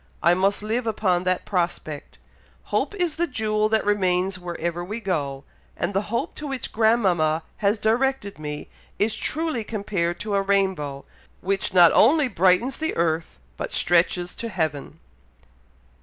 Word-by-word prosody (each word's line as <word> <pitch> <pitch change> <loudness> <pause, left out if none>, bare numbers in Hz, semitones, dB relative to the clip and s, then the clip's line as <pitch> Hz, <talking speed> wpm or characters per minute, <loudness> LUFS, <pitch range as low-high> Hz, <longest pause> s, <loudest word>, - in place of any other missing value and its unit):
I 170 - +6
must 195 +3 +1
live 230 +3 -1
upon 185 -5 +1
that 185 0 0
prospect. 170 -5 -3 0.6
Hope - - 0
is 350 -5 -1
the 345 +1 +1
jewel 215 -4 0
that 220 0 +1
remains 185 -2 +1
wherever 175 -1 -4
we 210 +6 -5
go, 145 -10 -2 0.3
and - - -2
the 195 - +1
hope 235 +8 -2
to 300 - -5
which 270 -3 -4
grandmama 185 -9 +2
has 205 +1 +1
directed 225 - 0
me, 150 -1 -5 0.3
is 215 +2 +1
truly 315 -7 -1
compared 195 -6 -2
to 210 -1 -3
a 200 - +3
rainbow, 190 -8 0 0.4
which 195 +3 -1
not 175 -3 +7
only 290 +4 +5
brightens 190 +4 +2
the 315 0 -2
earth, 165 - -1 0.2
but - - -4
stretches 175 +1 +2
to 230 - -4
heaven." 160 -5 -3
195 Hz, 150 wpm, -24 LUFS, 175-220 Hz, 0.6 s, not